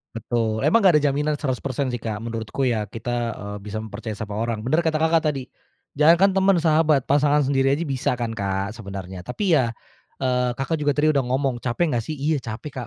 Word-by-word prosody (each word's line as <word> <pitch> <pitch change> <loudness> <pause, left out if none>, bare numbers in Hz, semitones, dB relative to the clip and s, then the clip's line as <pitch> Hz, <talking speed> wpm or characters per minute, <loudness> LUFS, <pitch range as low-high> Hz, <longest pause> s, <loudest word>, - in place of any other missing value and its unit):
Betul, 115 -1 -1
emang 230 - +4
nggak 185 -3 +6
ada - - -6
jaminan 150 +2 0
100% 135 -1 -2
sih, 120 - -3
Kak. 110 -1 -4
Menurutku 115 +3 -3
ya 110 -4 0
kita, 115 +2 -4 0.2
eee, 100 0 -7
bisa 105 +2 -5
mempercayai 110 0 -6
sama 105 -1 -5
orang. 115 -2 -2
Bener 145 +7 +2
kata 160 -2 0
Kakak 160 +1 +3
tadi, 135 -2 -5 0.5
jangankan 170 +6 +5
temen, 195 0 +3
sahabat, 155 -3 +3
pasangan 145 +1 +3
sendiri 135 0 +2
aja 170 - -2
bisa 135 -5 -1
kan, 120 -2 -3
Kak, 100 -2 -2
sebenarnya. 95 -4 -7
Tapi 175 - -2
ya, 120 -5 +1 0.5
eee, 125 -1 +1
Kakak 150 +5 -2
juga 145 -1 +1
tadi 155 +1 +3
udah 140 -2 +1
ngomong, 130 0 0
"Capek 130 +8 0
nggak 120 -2 0
sih?" 155 - -3
Iya, 145 +1 0
capek, 115 +5 -7
130 Hz, 200 wpm, -23 LUFS, 110-150 Hz, 0.5 s, nggak